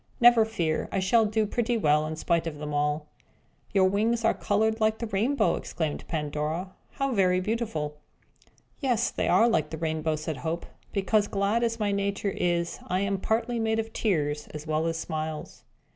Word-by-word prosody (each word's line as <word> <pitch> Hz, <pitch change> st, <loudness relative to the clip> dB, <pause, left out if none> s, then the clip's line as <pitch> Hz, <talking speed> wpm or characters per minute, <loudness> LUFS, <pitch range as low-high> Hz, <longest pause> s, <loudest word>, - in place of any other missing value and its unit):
Never 240 Hz, -2 st, +7 dB
fear! 170 Hz, -8 st, -1 dB
we -, -, 0 dB
shall 215 Hz, +4 st, +3 dB
do 215 Hz, +1 st, +1 dB
pretty 240 Hz, +2 st, 0 dB
well 150 Hz, -5 st, +3 dB
in 160 Hz, -, -4 dB
spite 165 Hz, +1 st, 0 dB
of 155 Hz, -2 st, -5 dB
them 150 Hz, 0 st, -5 dB
all." 150 Hz, +1 st, 0 dB, 0.7 s
"Your 195 Hz, -3 st, +4 dB
wings 225 Hz, +4 st, +1 dB
are 225 Hz, -, +4 dB
coloured 220 Hz, +2 st, +1 dB
like 215 Hz, 0 st, +3 dB
the 230 Hz, -, -3 dB
rainbow!" 215 Hz, -1 st, +1 dB
exclaimed 155 Hz, -3 st, -4 dB
Pandora. 155 Hz, +3 st, -2 dB, 0.2 s
"How 275 Hz, -1 st, -1 dB
very 185 Hz, -3 st, +3 dB
beautiful!" 185 Hz, -8 st, -2 dB, 0.8 s
"Yes, 245 Hz, -5 st, +1 dB
they -, -, -1 dB
are 230 Hz, -, +5 dB
like 155 Hz, -10 st, +1 dB
the 160 Hz, -, -5 dB
rainbow," 160 Hz, -1 st, -1 dB
said 155 Hz, -1 st, -4 dB
Hope, 165 Hz, +4 st, -3 dB, 0.3 s
"because, 205 Hz, +1 st, +2 dB
glad 200 Hz, +4 st, +1 dB
as 230 Hz, 0 st, 0 dB
my 210 Hz, -1 st, +1 dB
nature 200 Hz, 0 st, -1 dB
is, 170 Hz, -1 st, 0 dB
I 185 Hz, +1 st, 0 dB
am 200 Hz, -1 st, 0 dB
partly 235 Hz, +3 st, 0 dB
made 220 Hz, 0 st, +1 dB
of 225 Hz, 0 st, -3 dB
tears 150 Hz, -8 st, 0 dB
as 150 Hz, 0 st, -8 dB
well 155 Hz, +1 st, 0 dB
as 165 Hz, 0 st, -1 dB
smiles." 155 Hz, -1 st, -5 dB
195 Hz, 180 wpm, -27 LUFS, 155-220 Hz, 0.8 s, Never